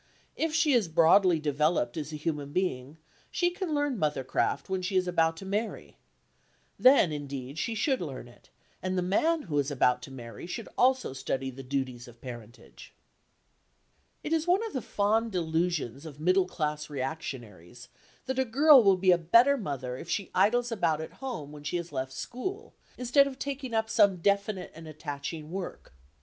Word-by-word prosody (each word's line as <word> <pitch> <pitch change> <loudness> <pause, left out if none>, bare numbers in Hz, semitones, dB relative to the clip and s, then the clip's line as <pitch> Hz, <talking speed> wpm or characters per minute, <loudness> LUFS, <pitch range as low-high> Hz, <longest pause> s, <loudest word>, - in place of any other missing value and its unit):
If 320 -1 -1
she 310 -3 +3
is 230 -7 +3
broadly 170 +2 +5
developed 150 -4 0
as 155 -1 -4
a - - -5
human 150 -2 -3
being, 145 -5 -2 0.3
she 350 0 +1
can 355 -4 -3
learn 290 -5 0
mothercraft 150 -5 -1
when 190 -1 -2
she 190 +2 -3
is 185 -1 +2
about 165 -2 +2
to 195 - -8
marry. 210 +4 -4 0.8
Then, 255 - +6
indeed, 140 -1 -6
she 230 - -2
should 260 +3 +1
learn 135 -7 -6
it, 120 - -20 0.3
and 185 0 -2
the 180 - +1
man 310 - +1
who 150 -5 -1
is 140 0 0
about 125 -3 +2
to 135 - -10
marry 120 +1 -9
should 220 +4 -6
also 255 - +2
study 135 0 -3
the 135 +1 -9
duties 130 -2 -3
of 120 -1 -15
parentage. 120 -1 -11 1.3
It 310 - -2
is 325 +1 0
one 380 +6 +3
of 445 - -6
the 260 - -2
fond 220 +3 0
delusions 165 - -1
of 145 -2 -11
middle 185 +3 +3
class 150 -3 -3
reactionaries 125 - -6 0.4
that 260 0 -2
a - - +4
girl 275 +3 +7
will 195 -3 +4
be 185 0 +4
a 175 - +4
better 235 - +5
mother 135 - -4
if 165 - -9
she 200 +3 -2
idles 235 +6 +2
about 165 -8 +1
at 160 - -7
home 235 - -5
when 150 -1 -11
she 165 +4 -2
has 170 0 -6
left 130 0 -3
school, 255 - -6 0.2
instead 255 +3 +4
of 265 -2 -7
taking 270 -4 -4
up 220 0 +1
some 200 -4 +4
definite 200 +1 0
and 160 0 -11
attaching 155 +1 -6
work. 185 - -6
175 Hz, 180 wpm, -29 LUFS, 140-230 Hz, 1.3 s, girl